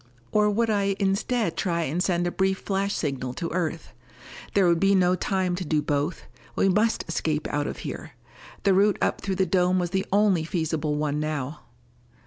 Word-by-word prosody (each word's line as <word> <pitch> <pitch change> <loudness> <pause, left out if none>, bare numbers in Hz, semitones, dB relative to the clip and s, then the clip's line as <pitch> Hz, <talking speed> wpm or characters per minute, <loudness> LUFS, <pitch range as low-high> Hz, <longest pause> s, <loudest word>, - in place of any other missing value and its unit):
Or 210 0 +3
would 225 +2 +1
I 200 -1 +1
instead 205 +4 0
try 170 -3 0
and 160 +4 -1
send 175 -2 +1
a 175 - 0
brief 190 +1 +1
flash 200 0 -1
signal 130 -4 -3
to 170 - -4
Earth? 165 -2 -3 0.6
There 195 -3 +5
would 170 -1 +3
be 195 +2 +4
no 180 -1 +4
time 185 0 0
to 185 - -3
do 155 -2 +1
both: 145 +3 -1 0.3
we 195 - +3
must 215 +4 +1
escape 155 -2 -1
out 145 0 -1
of - - -5
here. 160 -4 -6 0.5
The 195 - +4
route 200 +2 +3
up - - 0
through 195 -1 -2
the 190 0 +2
dome 180 +1 +2
was 175 -2 -1
the 190 0 -1
only 200 -4 +3
feasible 160 -2 -1
one 150 0 -1
now. 150 -1 -3
180 Hz, 190 wpm, -25 LUFS, 160-195 Hz, 0.6 s, There